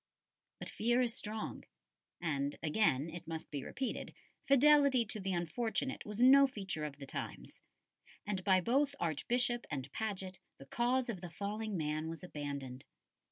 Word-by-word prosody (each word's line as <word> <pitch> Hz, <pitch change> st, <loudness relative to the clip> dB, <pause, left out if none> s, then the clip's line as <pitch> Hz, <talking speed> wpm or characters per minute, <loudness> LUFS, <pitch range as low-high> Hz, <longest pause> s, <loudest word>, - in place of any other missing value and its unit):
But -, -, -7 dB
fear 240 Hz, +3 st, +1 dB
is 240 Hz, -2 st, +1 dB
strong 215 Hz, -2 st, -4 dB, 0.6 s
and 145 Hz, -4 st, -1 dB
again 155 Hz, -4 st, +2 dB
it 170 Hz, 0 st, -8 dB
must 160 Hz, -1 st, -5 dB
be 140 Hz, -3 st, -3 dB
repeated 265 Hz, -1 st, -4 dB, 0.3 s
fidelity 275 Hz, -2 st, +6 dB
to 215 Hz, 0 st, -2 dB
the 190 Hz, -1 st, -2 dB
unfortunate 220 Hz, -, -2 dB
was 210 Hz, +1 st, -5 dB
no 275 Hz, +3 st, +8 dB
feature 195 Hz, -, -4 dB
of 140 Hz, -2 st, -6 dB
the 140 Hz, -, -8 dB
times; -, -, -7 dB, 0.6 s
and 195 Hz, -2 st, -2 dB
by 190 Hz, -2 st, +5 dB
both 275 Hz, +7 st, +2 dB
Archbishop 240 Hz, -, 0 dB
and 135 Hz, -2 st, -4 dB
Paget 190 Hz, -3 st, -4 dB, 0.2 s
the 135 Hz, -, -12 dB
cause 245 Hz, -, +1 dB
of 205 Hz, -7 st, -4 dB
the 175 Hz, -, -6 dB
falling 205 Hz, +3 st, -3 dB
man 155 Hz, 0 st, -1 dB
was 165 Hz, +2 st, -7 dB
abandoned. 140 Hz, -6 st, -5 dB
195 Hz, 155 wpm, -35 LUFS, 155-240 Hz, 0.6 s, no